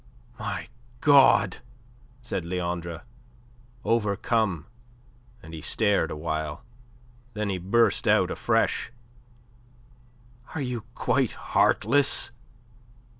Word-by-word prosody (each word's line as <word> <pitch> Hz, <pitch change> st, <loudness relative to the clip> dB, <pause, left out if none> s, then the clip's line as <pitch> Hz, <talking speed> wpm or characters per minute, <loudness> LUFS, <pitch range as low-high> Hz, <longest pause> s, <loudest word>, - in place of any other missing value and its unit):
"My 100 Hz, -5 st, -4 dB, 0.3 s
God!" 135 Hz, -10 st, +5 dB, 0.7 s
said 115 Hz, -7 st, -3 dB
Leandre, 85 Hz, -1 st, -4 dB, 0.8 s
overcome, 105 Hz, -5 st, 0 dB, 0.8 s
and 80 Hz, -, -11 dB
he 80 Hz, -, -7 dB
stared 105 Hz, +5 st, +1 dB
awhile. 80 Hz, +1 st, -4 dB, 0.7 s
Then 105 Hz, -1 st, -2 dB
he 95 Hz, -, -2 dB
burst 115 Hz, +6 st, +2 dB
out -, -, +3 dB
afresh. -, -, 0 dB, 1.6 s
"Are 160 Hz, -, -2 dB
you 125 Hz, -4 st, -4 dB
quite -, -, +1 dB
heartless? 145 Hz, -2 st, +2 dB
100 Hz, 80 wpm, -26 LUFS, 85-115 Hz, 1.6 s, God